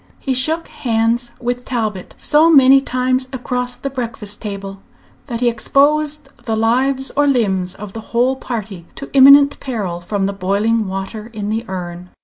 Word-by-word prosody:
He 265 - -2
shook 315 +6 0
hands 235 -1 -1
with 245 0 -3
Talbot 215 -7 -4
so 310 +3 +4
many 270 -3 +7
times 255 0 -1
across 250 -1 -3
the 275 +2 -5
breakfast 230 -5 -6
table 195 -2 -6 0.5
that 235 -3 -4
he 245 - +2
exposed 290 +5 +1 0.2
the 225 - -1
lives 260 +4 +1
or 290 0 +3
limbs 195 -8 +1
of 205 -1 -9
the 225 - -6
whole 245 +3 +2
party 215 -9 -6
to 280 - -9
imminent 280 +1 +7
peril 200 -10 -4
from 195 +2 -2
the 200 - -2
boiling 200 +3 0
water 195 +4 -6
in 210 -1 -4
the 220 +2 -2
urn. 180 -1 -6
235 Hz, 160 wpm, -18 LUFS, 205-265 Hz, 0.5 s, many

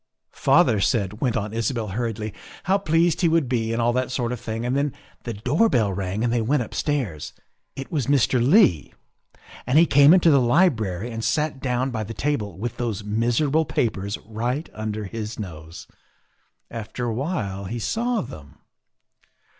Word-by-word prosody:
" - - -58
Father 105 - +3
said," 105 -2 0
went 125 -4 +1
on 105 -1 -3
Isabel 115 -1 -2
hurriedly, 110 0 -3 0.2
" - - -17
how 195 +2 +2
pleased 170 -1 +2
he 175 - +4
would 165 -4 +2
be 115 -3 -1
and 115 - -1
all 120 +1 +2
that 130 0 -1
sort 125 -2 -2
of 125 - -4
thing, 115 0 -4
and 125 +2 0
then 140 0 0 0.3
the 120 - -3
door 145 - +2
bell 110 - +1
rang 95 +3 -3
and 120 -1 +1
they 120 - +1
went 125 +4 +1
upstairs. 115 - -3 0.4
It 135 - -7
was 145 -7 -1
Mr. 130 -3 +3
Leigh, 130 - +4 0.7
and 130 +4 +3
he 165 - +7
came 145 -1 +6
into 175 -2 +6
the 140 -2 +5
library 120 - +1
and 115 0 -5
sat 150 -1 0
down 130 0 -1
by 110 -2 -3
the 110 +2 -7
table 110 - -2
with 115 +4 -4
those 110 -4 -3
miserable 120 +9 +1
papers 105 -8 -2
right 120 +8 -3
under 110 0 -4
his 105 +2 -6
nose. 80 -5 -8 0.9
After 115 +2 -5
awhile 115 - -3
he 115 +6 -4
saw 230 - -1
them. 75 - -10
120 Hz, 180 wpm, -23 LUFS, 110-140 Hz, 0.9 s, he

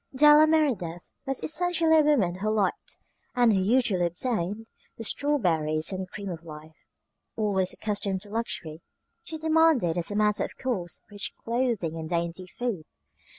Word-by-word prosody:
Della 300 +2 +7
Merideth 235 - 0 0.2
was 270 -1 -1
essentially 335 0 +2
a 315 - +6
woman 220 -13 +2
who 215 +2 -1
liked 210 -3 -1 0.4
and 240 -3 +4
who 195 - +2
usually 200 -4 +2
obtained 205 +2 -2 0.3
the 225 - -6
strawberries 170 - +1
and 185 -1 -4
cream 200 0 -7
of 170 -2 -7
life. 155 -1 -13 0.5
Always 195 -4 0
accustomed 200 -3 -2
to 205 0 -9
luxury, 175 -8 -4 0.4
she 320 - -7
demanded 315 - +3
as 170 - -1
a 205 - -4
matter 210 0 +2
of - - -7
course 195 -10 -3
rich 205 0 -4
clothing 230 -9 -1
and 160 0 -6
dainty 170 +1 -2
food. 210 -6 -4
205 Hz, 150 wpm, -27 LUFS, 175-260 Hz, 0.5 s, Della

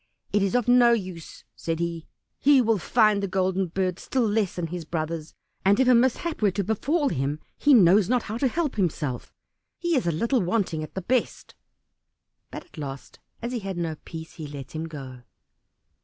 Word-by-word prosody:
"It 205 - +3
is 195 +3 0
of 245 -2 +1
no 245 -1 +6
use," 185 -7 -5
said 165 -1 -3
he, 170 -1 -3 0.3
"he 285 -1 +5
will 225 -4 +2
find 215 +2 +3
the 200 - -1
Golden 190 0 0
Bird 185 +1 -2
still 255 -4 0
less 210 -3 0
than 175 - -2
his 170 +1 -5
brothers, 155 0 -4 0.3
and 200 +3 +4
if 260 - +4
a 255 - +7
mishap 260 +7 +1
were 210 - +4
to 200 +2 -2
befall 280 - 0
him 140 - -1 0.2
he 290 -2 +5
knows 195 -1 +5
not 250 -1 +2
how 220 +2 -5
to 270 - +3
help 300 -2 -2
himself; 150 -9 -2 0.5
he 345 -1 0
is 250 -10 +1
a - - +3
little 230 - +1
wanting 180 -3 0
at 155 - -8
the 190 - -4
best." 250 +5 -1 1.0
But - - -8
at 255 - -14
last, 135 -2 -7 0.2
as 235 - -2
he 245 - -2
had 195 -3 -5
no 165 -2 -2
peace, 160 -1 -9
he 155 -3 -6
let 140 -2 -8
him 160 +1 -4
go. 135 -5 -9
190 Hz, 200 wpm, -25 LUFS, 165-235 Hz, 1.0 s, a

